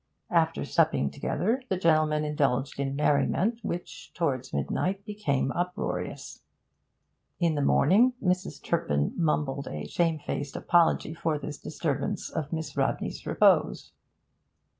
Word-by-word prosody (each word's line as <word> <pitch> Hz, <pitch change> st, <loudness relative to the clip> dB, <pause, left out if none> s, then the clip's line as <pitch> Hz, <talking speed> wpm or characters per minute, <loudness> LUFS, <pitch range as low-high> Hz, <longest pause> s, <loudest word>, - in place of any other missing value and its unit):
After -, -, +2 dB
supping 70 Hz, -, +2 dB
together, 225 Hz, -, -1 dB
the 190 Hz, -, +1 dB
gentlemen 155 Hz, -3 st, +2 dB
indulged 140 Hz, -3 st, 0 dB
in 140 Hz, 0 st, -1 dB
merriment 165 Hz, +10 st, +1 dB
which, 175 Hz, +1 st, -6 dB
towards 130 Hz, -7 st, -1 dB
midnight, 185 Hz, -, -1 dB
became 145 Hz, -11 st, -1 dB
uproarious. 180 Hz, +3 st, -4 dB, 1.0 s
In 170 Hz, -2 st, +2 dB
the 145 Hz, -, -1 dB
morning 210 Hz, -, +4 dB
Mrs. 180 Hz, -1 st, -1 dB
Turpin 75 Hz, -, 0 dB
mumbled 145 Hz, -4 st, 0 dB
a 75 Hz, 0 st, -5 dB
shamefaced 155 Hz, -, -1 dB
apology 170 Hz, -2 st, +2 dB
for 165 Hz, -2 st, -1 dB
this 150 Hz, 0 st, -7 dB
disturbance 160 Hz, +5 st, -3 dB
of 150 Hz, -2 st, -4 dB
Miss 160 Hz, -4 st, -4 dB
Rodney's -, -, -2 dB
repose. -, -, +3 dB
155 Hz, 120 wpm, -28 LUFS, 140-175 Hz, 1.0 s, morning